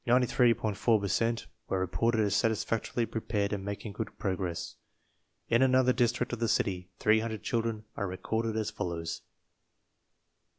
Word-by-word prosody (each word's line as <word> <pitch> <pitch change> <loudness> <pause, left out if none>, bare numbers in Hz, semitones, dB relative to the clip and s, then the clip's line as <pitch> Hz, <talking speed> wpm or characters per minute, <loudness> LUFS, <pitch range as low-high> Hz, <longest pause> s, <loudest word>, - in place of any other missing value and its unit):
4 120 +1 +5 0.8
per 100 - -2
cent 115 +3 0 0.2
were 95 - +1
re 95 - +1
ported 110 +6 +1
as 100 -2 +1
satisfactorily 110 +2 0
prepared 105 -2 -2
and 100 -2 -3
making 100 +2 -5
good 110 - -5
progress. 95 -4 -2 0.7
In 115 +2 +3
another 130 -1 +5
district 120 0 +1
of 120 - -3
the 115 - +1
city, 90 -4 0
300 110 0 +1
children 115 -2 -1
are 100 - -2
re 90 0 -5
corded 110 +1 -1
as 110 0 -1
follows: 85 -5 -4
1. - - -42
110 Hz, 155 wpm, -30 LUFS, 100-115 Hz, 0.8 s, 4